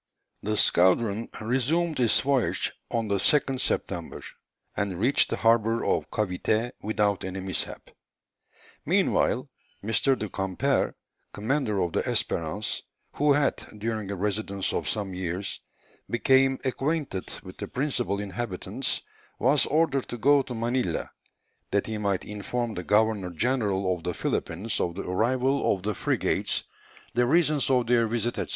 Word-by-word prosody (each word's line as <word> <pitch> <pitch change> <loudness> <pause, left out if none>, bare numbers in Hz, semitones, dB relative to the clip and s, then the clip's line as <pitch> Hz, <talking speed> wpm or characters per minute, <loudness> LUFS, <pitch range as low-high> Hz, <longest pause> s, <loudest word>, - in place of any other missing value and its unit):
The 105 +1 -1
squadron 100 +6 +3
resumed 140 +8 +1
its 120 -3 +4
voyage 135 -4 +1 0.2
on 115 -2 -1
the 100 -1 +1
2nd 135 +5 +2
September, - - -2 0.5
and 100 -4 -2
reached 135 +7 +3
the - - 0
harbour 115 0 +2
of - - 0
Cavité 110 +3 0
without 105 -2 0
any 95 0 -4
mishap. 95 0 -4 0.9
Meanwhile, - - +2 0.4
M. 110 - -3 0.3
du 105 - -3
Camper, 95 -1 0 0.4
commander 115 0 -1
of 85 - -3
the - - +2
Espérance 85 +6 -1 0.4
who 145 0 +4
had, 145 0 +2 0.2
during 110 -1 -3
a 100 - -2
residence 100 0 -1
of - - -1
some 100 -3 -2
years, 90 +1 -3 0.5
become 130 +2 +3
acquainted 135 - -1
with - - -11
the - - -5
principal 125 -7 -1
inhabitants, 100 0 -3 0.3
was 135 +4 +3
ordered 145 -3 +1
to 120 - -4
go 140 +4 +5
to 125 -2 -6
Manilla, 115 -5 -1 0.6
that 100 0 +1
he 110 -1 -4
might 100 -3 0
inform 115 +3 -3
the 90 - -5
Governor 105 -1 +2
General 100 -1 0
of 90 - -11
the 90 - -2
Philippines 95 +7 -2
of 85 -1 -1
the 100 - -4
arrival 125 +7 +1
of 95 - -11
the 105 +1 -1
frigates, - - 0 0.5
the 120 +1 +2
reasons 155 -1 +3
of 125 -2 +3
their 115 -1 +3
visit, 120 +1 -1
&c. - - -2
110 Hz, 145 wpm, -27 LUFS, 100-130 Hz, 0.9 s, go